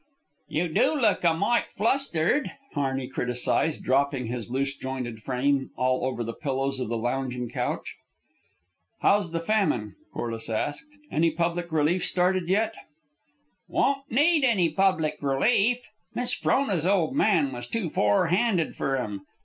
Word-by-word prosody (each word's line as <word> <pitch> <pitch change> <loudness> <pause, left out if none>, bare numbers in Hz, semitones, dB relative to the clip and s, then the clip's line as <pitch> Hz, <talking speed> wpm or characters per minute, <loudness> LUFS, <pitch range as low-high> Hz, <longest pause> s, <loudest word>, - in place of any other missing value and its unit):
"You 170 +3 -1
do 165 - +2
look 210 -8 +2
a 170 - +5
mite 220 +7 +1
flustered," 230 - +1 0.2
Harney 135 -3 -1
criticised, 125 +4 -1
dropping 135 -1 +1
his 120 0 -5
loose 140 +2 -1
jointed 125 -5 -5
frame 135 +3 0
all 130 0 +1
over 130 -2 -2
the 115 0 -4
pillows 135 -1 -2
of 125 - -3
the 115 - -1
lounging 125 0 -2
couch. - - -3 1.0
"How's 200 -3 +3
the 165 - -1
famine?" 165 - 0 0.2
Corliss 115 -1 -4
asked. 145 - -2 0.2
"Any 165 +2 +3
public 170 +1 -2
relief 160 +3 +2
started 180 -1 +1
yet?" 220 +3 +2 0.9
"Won't 275 0 0
need 295 +5 +3
any 200 -10 +3
public 160 -4 +1
relief. 215 - +2 0.3
Miss 245 0 +1
Frona's 195 - +1
old 195 +3 +2
man 170 - +3
was 120 -1 -6
too 185 - -2
forehanded 175 - +2
fer 135 - -1
'em. 105 -6 -4
155 Hz, 140 wpm, -26 LUFS, 130-195 Hz, 1.0 s, a